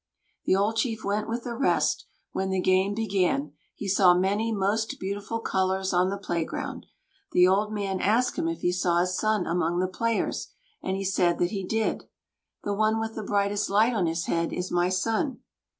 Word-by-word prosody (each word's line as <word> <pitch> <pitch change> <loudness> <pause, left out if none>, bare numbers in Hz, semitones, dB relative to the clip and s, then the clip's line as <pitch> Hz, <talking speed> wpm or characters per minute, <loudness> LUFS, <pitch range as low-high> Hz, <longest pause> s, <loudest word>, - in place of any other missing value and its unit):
The - - +3
old 205 +3 +1
chief 225 -3 -1
went 210 +2 -1
with 235 +1 -3
the 240 - -4
rest; 265 - +1 0.3
when 190 0 -2
the 190 0 0
game 185 +2 +2
began, 185 -10 0 0.2
he 205 - -6
saw 185 -2 +5
many 200 +5 +1
most 215 +2 0
beautiful 200 +4 -3
colors 190 -2 0
on 180 +1 +3
the 200 - -2
playground. 170 -4 -4 0.5
The 180 0 +6
old 205 +3 +2
man 200 -3 -2
asked 230 +5 +2
him 330 -1 -1
if 330 - -3
he 175 - +2
saw 175 -1 +2
his 180 +1 0
son 215 -2 +1
among 170 0 0
the 185 +1 +1
players, 230 +5 -1 0.3
and 190 0 -2
he 195 - -3
said 180 -2 +2
that 175 - 0
he 195 -3 -3
did. 220 +4 -1 0.6
"The 205 - -1
one 215 +2 +2
with 225 0 -3
the 220 - -5
brightest 200 0 0
light 215 +5 +3
on 190 -7 +1
his 165 +1 -1
head 165 0 0
is 180 +1 -3
my 175 0 +2
son." 225 +8 -1
195 Hz, 195 wpm, -27 LUFS, 185-220 Hz, 0.6 s, The